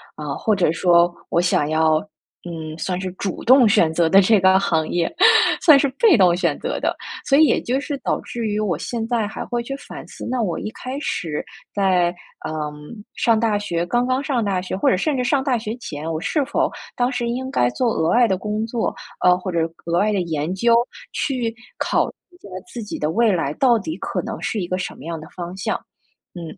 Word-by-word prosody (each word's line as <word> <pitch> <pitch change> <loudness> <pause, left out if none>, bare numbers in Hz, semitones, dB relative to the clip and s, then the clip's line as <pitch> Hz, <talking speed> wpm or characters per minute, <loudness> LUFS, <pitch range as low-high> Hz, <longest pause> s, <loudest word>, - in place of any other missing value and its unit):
啊， 150 -2 -5
或 215 -2 +1
者 175 -4 +2
说 175 0 +4 0.2
我 170 - +2
想 150 -4 +1
要， 155 0 +3 0.5
嗯， 160 -2 -6
算 180 +1 -2
是 185 -1 -4
主 190 -1 -4
动 255 -1 +7
选 200 -7 +4
择 165 0 +2
的 195 +2 +7
这 210 +1 +4
个 190 +1 +5
行 160 -4 0
业， 170 -1 -1 0.5
算 310 -5 +8
是 280 - +2
被 445 - +6
动 180 -4 +5
选 180 - 0
择 - - -3
的。 - - -1 0.3
所 280 -1 +4
以 315 - +7
也 - - +2
就 255 +3 -1
是 285 -1 -4
导 - - 0
致 235 -2 -5
于 210 0 -1
我 185 -7 0
现 225 +5 -4
在 230 -4 0
还 - - -6
会 240 0 -2
去 275 +3 -5
反 - - -10
思， - - -9
那 250 -2 0
我 175 -6 -1
一 - - -4
开 255 +4 -6
始 160 - -3 0.3
在， 180 -3 +2 0.3
呃， 155 - -4 0.6
上 230 -2 +3
大 220 -2 +1
学 175 -4 -2
刚 240 +7 +1
刚 260 +2 0
上 265 -5 0
大 190 -2 0
学 185 - -4
或 - - +2
者 - - +3
甚 290 +6 0
至 250 - 0
上 265 +1 +1
大 260 -4 +1
学 220 0 -4
前， 160 -8 -6
我 160 - -2
是 300 -3 0
否 290 - 0 0.3
当 245 +1 +1
时 245 -2 -2
应 260 +2 -3
该 120 - +2
做 245 - 0
额 160 +1 0
外 240 +5 +5
的 190 -2 0
工 210 +2 -2
作， 230 -1 -2 0.3
呃， 180 0 +6
或 185 0 -5
者 170 - 0 0.3
额 170 - +1
外 215 +1 +2
的 190 - +1
研 160 0 -2
究， 235 +3 +3 0.4
去 245 -5 -1 0.2
考 - - +1
虑 - - -9 0.2
一 355 - -20
下 200 - -14 0.2
自 235 -3 -6
己 210 - -6
的 150 - 0
未 225 +5 +3
来 165 -6 -1
到 245 -4 +4
底 315 +10 -5
可 - - -3
能 - - -6
是 215 - -2
一 175 - -3
个 185 +1 -1
什 - - -4
么 140 - -12
样 165 -1 -4
的 155 - -11
方 175 0 -6
向， 185 - -1 0.6
嗯。 175 - -7
200 Hz, 250 characters per minute, -21 LUFS, 175-240 Hz, 0.6 s, 算